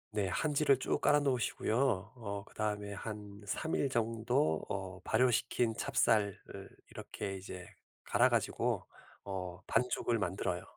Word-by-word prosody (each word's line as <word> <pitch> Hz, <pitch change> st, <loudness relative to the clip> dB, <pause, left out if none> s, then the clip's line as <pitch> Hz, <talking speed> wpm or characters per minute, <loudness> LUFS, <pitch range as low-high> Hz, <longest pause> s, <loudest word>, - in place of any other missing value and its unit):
네. 100 Hz, -2 st, +1 dB
한지를 145 Hz, +6 st, +3 dB
쭉 130 Hz, -, -1 dB
깔아 145 Hz, 0 st, +5 dB
놓으시고요 120 Hz, -4 st, +1 dB
어 100 Hz, -4 st, -5 dB
그다음에 105 Hz, -1 st, -3 dB
한 105 Hz, -1 st, -7 dB
3 160 Hz, +9 st, -2 dB
일 140 Hz, -, +1 dB
정도 115 Hz, -, +1 dB
어 95 Hz, -1 st, -4 dB
발효시킨 120 Hz, -2 st, +2 dB
찹쌀을 105 Hz, -4 st, +2 dB, 0.5 s
이렇게 95 Hz, -1 st, -5 dB
이제 90 Hz, -1 st, -8 dB, 0.4 s
갈아 -, -, +4 dB
가지고 -, -, 0 dB, 0.4 s
어 90 Hz, -2 st, -5 dB
반죽을 120 Hz, -1 st, +1 dB
만들어요. 90 Hz, -1 st, -1 dB
105 Hz, 260 characters per minute, -34 LUFS, 95-125 Hz, 0.5 s, 깔아